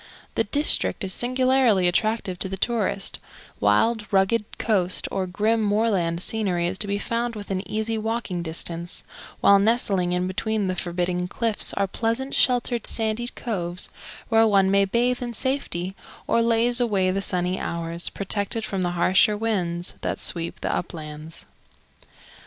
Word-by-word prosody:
The 225 - +1
district 290 -1 +3
is 190 -1 -3
singularly 255 -5 +2
attractive 195 0 0
to 190 - 0
the 190 - -4
tourist; 205 -3 -1 0.4
wild, 210 - +2
rugged 200 +3 +1
coast 185 -5 +1
or 190 -1 -2
grim 215 +5 +1
moorland 200 -5 +1
scenery 190 -6 0
is 185 +2 -2
to 210 - +2
be 200 0 0
found 235 +3 -2
within 195 -3 -3
easy 220 +1 -1
walking 220 -5 -2
distance, 170 +1 -1 0.4
while 200 0 +6
nestling 200 -4 +2
in 180 0 0
between 210 +3 -1
the 185 -1 -1
forbidding 180 0 -2
cliffs 225 +3 0
are 200 - +1
pleasant 230 +7 -2
sheltered 245 -2 +1
sandy 225 +1 -1
coves 180 -8 -1 0.4
where 225 0 +4
one 195 -2 +3
may 200 0 +4
bathe 245 +5 +1
in 240 -1 -4
safety 210 -9 -2 0.3
or 230 - +2
laze 230 +1 +3
away 195 -6 +2
the 195 +1 -1
sunny 180 -1 0
hours, 170 0 -2
protected 205 +2 -2
from 195 -2 -3
the 175 -1 -1
harsher 190 +4 +4
winds 180 -6 -1
that - - -2
sweep 170 -1 -2
the - - -1
uplands. 155 -2 -6
200 Hz, 150 wpm, -24 LUFS, 180-225 Hz, 0.4 s, while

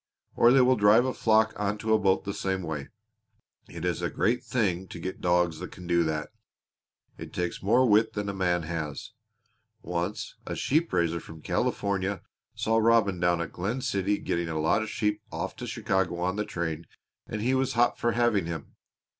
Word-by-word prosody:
Or 120 - +6
they 135 +1 +6
will 125 0 +4
drive 105 +4 +5
a 130 - -1
flock 110 0 +3
onto 105 +2 0
a 110 - +4
boat 95 -2 +2
the 100 +1 -4
same 95 -1 -2
way. 75 -4 -4 0.8
It 85 +1 -6
is 90 -1 -1
a 85 - 0
great 120 +3 0
thing 95 -6 -1
to - - -9
get 95 +3 -5
dogs 90 -2 +2
that 90 - -7
can 90 - -11
do 85 -1 +3
that. 75 -1 -2 0.9
It - - -8
takes 90 -1 -3
more 120 +6 +4
wit 110 +1 +4
than 105 -1 -3
a 100 - -2
man 90 -3 0
has. 80 +2 -5 0.7
Once 90 +4 -3
a - - -3
sheep 160 +4 +1
raiser 85 0 +1
from 80 -1 -12
California 100 -1 -1 0.3
saw 115 +1 +1
Robin 110 -5 +3
down 85 -1 +2
at 85 - -4
Glen 105 +9 -3
City 100 -5 0
getting 85 -1 -2
a 80 -1 -2
lot 80 +7 +2
of 110 - -4
sheep 105 -1 -1
off 85 +3 -4
to 125 - -6
Chicago 95 -6 -1
on 90 +2 -1
the 105 0 -1
train 85 -2 -4 0.4
and 110 - -4
he 125 +4 +1
was 130 0 +1
hot 120 0 +2
for 120 0 +1
having 115 -6 +2
him. 80 -4 -6
95 Hz, 195 wpm, -27 LUFS, 85-110 Hz, 0.9 s, Or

